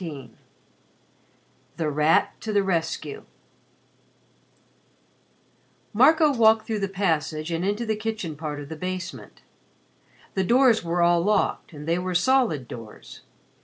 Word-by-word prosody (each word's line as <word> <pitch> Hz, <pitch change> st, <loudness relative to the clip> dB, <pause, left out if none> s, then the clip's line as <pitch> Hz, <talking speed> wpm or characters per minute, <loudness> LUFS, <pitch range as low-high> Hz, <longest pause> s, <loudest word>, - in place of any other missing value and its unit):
XVI 145 Hz, -8 st, -7 dB, 1.5 s
THE 155 Hz, -2 st, -1 dB
RAT 150 Hz, +2 st, +2 dB
TO 220 Hz, -, -4 dB
THE 205 Hz, -1 st, +2 dB
RESCUE 190 Hz, -, -3 dB, 2.7 s
Marco 300 Hz, +6 st, +5 dB
walked 220 Hz, -2 st, +4 dB
through 220 Hz, -2 st, -2 dB
the 195 Hz, -, -1 dB
passage 165 Hz, -5 st, -2 dB
and 165 Hz, +1 st, -2 dB
into 205 Hz, +4 st, -1 dB
the 220 Hz, -1 st, -1 dB
kitchen 215 Hz, -7 st, -4 dB
part 150 Hz, -1 st, -5 dB
of 145 Hz, -1 st, -9 dB
the 160 Hz, -, -6 dB
basement. 185 Hz, +2 st, -7 dB, 0.9 s
The 190 Hz, -, 0 dB
doors 240 Hz, +1 st, +4 dB
were 170 Hz, +1 st, 0 dB
all 170 Hz, 0 st, +4 dB
locked, 205 Hz, +1 st, 0 dB
and 150 Hz, -1 st, -10 dB
they 170 Hz, +2 st, +1 dB
were 180 Hz, 0 st, -3 dB
solid 175 Hz, -, +2 dB
doors. 115 Hz, -3 st, -11 dB
180 Hz, 130 wpm, -24 LUFS, 160-220 Hz, 2.7 s, Marco